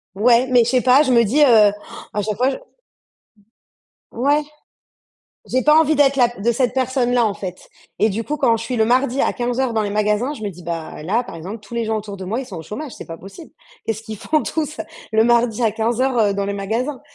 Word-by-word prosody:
Ouais, 235 Hz, +5 st, +4 dB
mais 245 Hz, -2 st, +6 dB
je 230 Hz, -, -1 dB
sais 255 Hz, -1 st, +2 dB
pas, 260 Hz, +3 st, +5 dB
je 260 Hz, -, 0 dB
me 235 Hz, -1 st, +5 dB
dis, 255 Hz, +9 st, +1 dB
heu, 295 Hz, -, +8 dB
han! 215 Hz, -5 st, +6 dB, 0.4 s
À 210 Hz, -, -1 dB
chaque 215 Hz, -1 st, -3 dB
fois, 255 Hz, +2 st, +2 dB
je -, -, -3 dB, 1.5 s
Ouais. 285 Hz, +5 st, +1 dB, 1.0 s
J'ai 255 Hz, 0 st, 0 dB
pas 300 Hz, 0 st, +6 dB
envie 315 Hz, -1 st, +4 dB
d'être 275 Hz, -1 st, +3 dB
la 245 Hz, -3 st, +4 dB
p 240 Hz, -4 st, -11 dB
de 235 Hz, +2 st, +2 dB
cette 250 Hz, +1 st, 0 dB
personne-là 250 Hz, -2 st, +1 dB
en 210 Hz, -, +1 dB
fait 185 Hz, -2 st, -8 dB, 0.3 s
et 215 Hz, 0 st, +3 dB
du 220 Hz, +3 st, -3 dB
coup, 300 Hz, -, -3 dB
quand 230 Hz, -4 st, +2 dB
je -, -, -6 dB
suis 245 Hz, +2 st, -3 dB
le 220 Hz, -, +3 dB
mardi 255 Hz, +3 st, +1 dB
à -, -, +1 dB
15:00 245 Hz, 0 st, -1 dB
dans 220 Hz, -, 0 dB
les 210 Hz, -, -1 dB
magasins, 210 Hz, +6 st, 0 dB
je 220 Hz, -, -11 dB
me 205 Hz, -, -3 dB
dis: 180 Hz, -1 st, -13 dB
«Bah 165 Hz, -2 st, -6 dB
là, 215 Hz, +10 st, 0 dB
par -, -, -10 dB
exemple, 190 Hz, +7 st, -7 dB
tous 215 Hz, -, -17 dB
les 235 Hz, -1 st, -2 dB
gens 220 Hz, 0 st, 0 dB
autour 205 Hz, -2 st, -6 dB
de 190 Hz, -, -6 dB
moi, 225 Hz, +7 st, -2 dB
ils 270 Hz, -, -6 dB
sont 185 Hz, -, -9 dB
au -, -, -7 dB
chômage, 255 Hz, -, -7 dB
c'est -, -, -10 dB
pas 165 Hz, -, -7 dB
possible». 195 Hz, -, -12 dB, 0.4 s
Qu'est-ce 220 Hz, 0 st, -3 dB
qu'ils 220 Hz, -2 st, -8 dB
font 310 Hz, -1 st, 0 dB
tous 310 Hz, -1 st, -3 dB, 0.4 s
le 220 Hz, +1 st, +4 dB
mardi 235 Hz, -1 st, +2 dB
à 225 Hz, -, +3 dB
15:00, 240 Hz, +3 st, 0 dB
heu, 205 Hz, -2 st, +2 dB
dans 200 Hz, 0 st, -1 dB
les 200 Hz, -, -2 dB
magasins? 230 Hz, +8 st, -3 dB
235 Hz, 250 wpm, -20 LUFS, 210-255 Hz, 1.5 s, heu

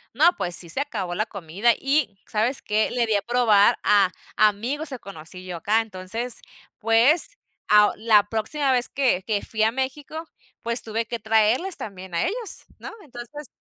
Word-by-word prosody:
No, 315 Hz, +7 st, +6 dB
pues, 175 Hz, -1 st, -3 dB
sí 170 Hz, -, -3 dB
se 165 Hz, -, -2 dB
acabó 200 Hz, -11 st, -4 dB
la 215 Hz, +4 st, 0 dB
comida. 200 Hz, +4 st, 0 dB
Y, 270 Hz, -8 st, 0 dB
¿sabes 230 Hz, +5 st, -1 dB
qué? 215 Hz, +1 st, 0 dB
Le 240 Hz, -1 st, 0 dB
di 220 Hz, -, +2 dB
a 200 Hz, -, 0 dB
probar 230 Hz, -4 st, +4 dB
a 200 Hz, -3 st, +4 dB, 0.3 s
amigos 235 Hz, +9 st, +1 dB
que 260 Hz, -, -6 dB
conocí 180 Hz, -2 st, -10 dB
yo 180 Hz, -2 st, -6 dB
acá. 215 Hz, +6 st, +2 dB
Entonces, 225 Hz, +3 st, -2 dB, 0.4 s
pues, 230 Hz, +9 st, +4 dB, 0.4 s
a 210 Hz, 0 st, +6 dB
la 215 Hz, -1 st, +4 dB
próxima 265 Hz, +6 st, -1 dB
vez 250 Hz, -1 st, +2 dB
que 255 Hz, -10 st, +1 dB
que 210 Hz, -3 st, 0 dB
fui 220 Hz, -1 st, -2 dB
a 220 Hz, -, +3 dB
México, 285 Hz, +5 st, -4 dB, 0.3 s
pues, 235 Hz, +1 st, 0 dB
tuve 225 Hz, +1 st, -2 dB
que 235 Hz, -, -3 dB
traerles 225 Hz, -, +2 dB
también 190 Hz, -3 st, -8 dB
a 170 Hz, -, 0 dB
ellos, 465 Hz, -1 st, -4 dB
¿no? -, -, -8 dB
Entonces, 270 Hz, +2 st, -10 dB
225 Hz, 175 wpm, -24 LUFS, 205-260 Hz, 0.4 s, No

